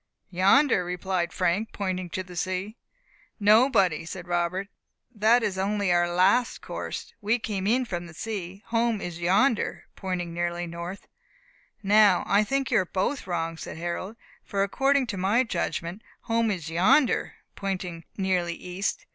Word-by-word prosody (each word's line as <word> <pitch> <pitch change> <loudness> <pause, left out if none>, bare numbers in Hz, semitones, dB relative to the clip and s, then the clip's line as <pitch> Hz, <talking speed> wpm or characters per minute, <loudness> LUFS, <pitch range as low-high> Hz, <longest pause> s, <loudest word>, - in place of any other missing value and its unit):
"Yonder," 195 +6 +4
replied 180 0 -2
Frank, 185 +5 0
pointing 185 -3 -3
to 185 +2 -3
the 180 -1 -12
sea. 185 +4 -3 0.6
"No, 215 +5 +6
buddy," 185 - +2
said 175 +2 -8
Robert, 175 +2 -1 0.5
"that 225 +2 +4
is 195 -3 -1
only 200 -1 0
our 175 0 +2
last 195 +8 +3
course; - - -6
we 215 +3 +2
came 200 -4 -3
in 250 +4 +2
from 175 -5 -5
sea. 195 +1 -6
Home 230 -1 +1
is 175 -3 -6
yonder," 205 +8 +2
pointing 180 -3 -3
nearly 175 0 -2
north. 170 +3 -7 0.8
"Now, 205 -2 +5
I 205 +2 +3
think 270 +5 -1
you 235 - +5
are 185 - 0
both 190 +8 -2
wrong," 165 -2 -2
said - - -7
Harold, 175 +5 -4 0.3
"for 195 -1 -1
according 270 +6 +2
to 210 -5 -5
my 200 +7 +3
judgment 175 -2 -3 0.2
home 230 0 +1
is 175 -6 -3
yonder," 190 - +3 0.2
pointing 185 -4 -4
nearly 180 -3 0
east. 180 +3 -4
190 Hz, 150 wpm, -26 LUFS, 175-215 Hz, 0.8 s, No